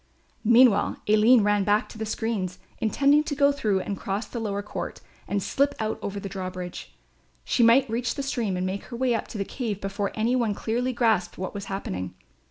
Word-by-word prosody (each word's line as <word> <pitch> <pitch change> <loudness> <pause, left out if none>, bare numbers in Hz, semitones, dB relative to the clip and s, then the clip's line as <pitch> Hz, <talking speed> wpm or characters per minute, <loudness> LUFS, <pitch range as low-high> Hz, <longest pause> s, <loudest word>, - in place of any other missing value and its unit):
Meanwhile 235 -2 +5
Aline 215 +2 +6
ran 205 -1 +2
back 205 +2 +2
to - - -11
the 220 - -3
screens, 210 -5 -2 0.2
intending 280 +6 +3
to 285 - -2
go 280 0 +4
through 210 -9 0
and 200 - -3
cross 200 +3 -3
the 235 - -6
lower 205 -2 -2
court 210 - -5 0.3
and 200 -1 -1
slip 280 +8 +1
out 220 0 -2
over 200 0 -4
the 200 - -5
drawbridge. 185 -2 -6 0.5
She - - +1
might 235 +4 +6
reach 235 +2 -2
the 280 - -3
stream 230 -8 -1
and 180 - -1
make 190 +2 -3
her 240 - -7
way 255 -1 +2
up 225 - -2
to - - -7
the 200 - -2
cave 220 -5 -4
before 200 0 -2
any 230 +3 +1
one 230 -5 +1
clearly 245 +5 -1
grasped 220 -8 +1
what 185 - -4
was 200 -1 -5
happening. 95 - -4
215 Hz, 205 wpm, -26 LUFS, 195-240 Hz, 0.5 s, Aline